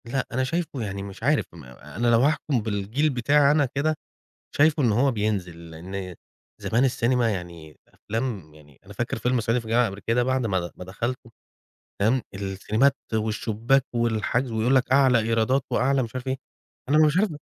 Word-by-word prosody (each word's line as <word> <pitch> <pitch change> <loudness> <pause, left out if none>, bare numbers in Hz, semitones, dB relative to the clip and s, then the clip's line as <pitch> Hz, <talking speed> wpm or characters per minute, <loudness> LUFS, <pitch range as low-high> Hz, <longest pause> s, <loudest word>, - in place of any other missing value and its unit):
لأ 130 +3 -2
أنا 130 +2 0
شايفه 155 -1 -3
يعني 100 -2 -4
مش 100 +2 -10
عارف 145 +3 +2
م 85 -3 -12
أنا 75 - -5
لو 115 -1 +5
هاحكم 145 -2 +1
بالجيل 110 +8 -1
بتاعي 140 +2 +3
أنا 150 -1 +3
كده، 145 +4 -1 0.6
شايفه 150 0 +3
إن 120 - +3
هو 130 +6 +3
بينزل، 95 -7 -3
لأن 90 +2 -7 0.5
زمان 120 +4 +2
السينما 120 -2 +1
يعني 85 -5 -7
أفلام 105 -8 -5
يعني 75 -2 -19
أنا - - -11
فاكر - - -3
فيلم 125 0 0
صعيدي 115 +3 +1
في 115 - -10
الجامعة 115 +2 +3
الأمريكية 100 +1 -2
ده 120 +1 +2
بعد 130 0 0
ما 95 -4 +1
د - - -16
ما - - -9
دخلته، 120 +6 -5 0.7
فاهم، 115 +6 +2
السينمات 100 +7 0 0.2
والشباك 110 +4 0
والحجز 120 +2 0
ويقول 115 +4 +2
لك 130 -1 +2
أعلى 130 -3 +5
إيرادات 115 +4 +1
وأعلى 135 +1 +2
مش 115 +1 -8
عارف 130 +1 -5
إيه. 130 0 -1 0.5
أنا 150 - +4
مش 150 +3 +2
عارف 210 +2 +3
115 Hz, 180 wpm, -25 LUFS, 100-130 Hz, 0.7 s, لو